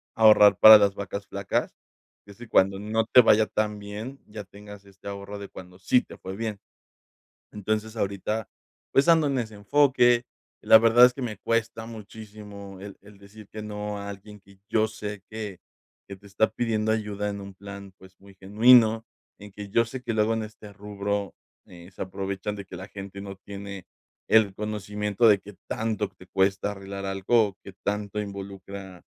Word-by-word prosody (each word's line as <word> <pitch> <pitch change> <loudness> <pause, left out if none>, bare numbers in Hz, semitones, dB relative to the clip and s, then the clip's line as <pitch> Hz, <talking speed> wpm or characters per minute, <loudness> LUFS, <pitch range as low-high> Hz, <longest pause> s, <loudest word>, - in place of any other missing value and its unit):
"Ahorrar 110 -2 +7
para 110 0 +11
las 100 -1 +2
vacas 100 0 -6
flacas", 100 0 -2 0.5
es 100 -1 -15
decir, 120 -2 -12
cuando 95 +1 +3
no 110 +2 -1
te 125 +3 +7
vaya 110 -2 +5
tan 105 -1 -2
bien, 105 +7 -8
ya 105 0 -8
tengas 105 0 -13
este 100 0 -15
ahorro 100 +1 -7
de 100 - -7
cuando 90 0 -12
sí 125 +7 +3
te - - -14
fue 95 +1 -7
bien, 110 -2 -4 0.9
entonces 110 +2 -3
ahorita, 100 +1 -2 0.5
pues, 135 +4 +4
ando 160 -3 +5
en 135 -2 0
ese 110 -3 -5
enfoque, 120 +1 +3 0.4
la - - +8
verdad 115 +2 +7
es 125 - +3
que 135 - -8
me 110 -4 -4
cuesta 115 +1 -2
muchísimo 105 -3 -11
el 100 0 -9
el 105 0 -17
decir 100 +1 -14
que 110 - -7
no 105 0 -5
a 100 0 -6
alguien 100 +1 -10
que 100 0 -21
yo 110 -1 +2
sé 105 -2 -7
que 110 -3 -6 0.5
que 100 - -8
te 100 - -17
está 100 +3 +1
pidiendo 110 -2 -1
ayuda 105 -2 -2
en 100 0 -5
un 100 0 -10
plan, 100 0 -10
pues, 95 0 -18
muy 100 0 -17
genuino 110 +3 +5 0.3
en 105 0 -12
que 100 +1 -9
yo 115 +3 +2
sé 125 +3 -7
que 115 - -2
luego 110 +1 +2
en 110 -1 -2
este 105 -1 -11
rubro, 100 0 -4 0.3
eh, 85 0 -14
se 90 - -11
aprovechan 95 +2 -4
de 100 -1 -8
que 95 - -10
la 95 +2 -8
gente 100 0 -9
no 100 -1 -8
tiene 100 -1 -9 0.4
el 110 -3 +4
conocimiento 105 +1 -1
de 100 -2 +5
que 100 +1 -13
tanto 110 -2 -2
te 90 - -18
cuesta 95 +1 0
arreglar 100 0 -7
algo, 100 +2 +1
que 100 - -10
tanto 105 0 -2
involucra, 100 -2 -9
105 Hz, 185 wpm, -26 LUFS, 100-110 Hz, 0.9 s, para